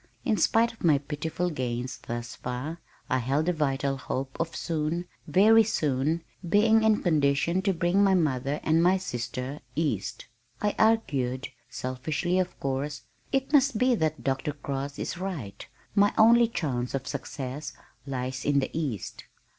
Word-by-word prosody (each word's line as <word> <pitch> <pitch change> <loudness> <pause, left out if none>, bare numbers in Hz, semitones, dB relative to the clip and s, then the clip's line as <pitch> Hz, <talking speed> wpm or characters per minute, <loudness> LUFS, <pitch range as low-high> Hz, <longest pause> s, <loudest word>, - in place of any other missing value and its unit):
In 220 - +3
spite 230 +2 +3
of 225 - -16
my 155 -4 +5
pitiful 160 +5 -3
gains 125 -3 -3
thus 120 0 -5
far, 130 +7 -5 0.3
I 130 - +1
held 140 +6 0
a 180 - +3
vital 140 -3 0
hope 130 0 -4
of 165 0 -2
soon, 165 +2 -2 0.2
very 220 +4 +6
soon 155 - 0 0.3
being 220 +4 +5
in 220 -1 +3
condition 155 +2 +2
to 195 +1 +2
bring 175 +3 +2
my 195 -1 +4
mother 140 -4 0
and 160 +1 +3
my 180 +2 +4
sister 130 -4 -4 0.2
east. 120 - -2 0.3
I 210 0 0
argued, 140 - +1 0.2
selfishly 150 +8 -1
of 185 -1 -2
course, 140 +2 -3 0.3
"It 270 +2 0
must 275 -4 +4
be 250 +2 +3
that 155 -8 -1
Dr. 135 +3 -1
Cross 140 -1 -4
is 175 - -4
right. 165 - -5 0.3
My 205 0 +3
only 235 +2 +7
chance 135 - -2
of 135 -1 -3
success 140 +1 -5 0.3
lies 130 -1 -3
in 145 -1 +2
the 130 - -2
east." 140 - -4
150 Hz, 155 wpm, -27 LUFS, 135-185 Hz, 0.3 s, only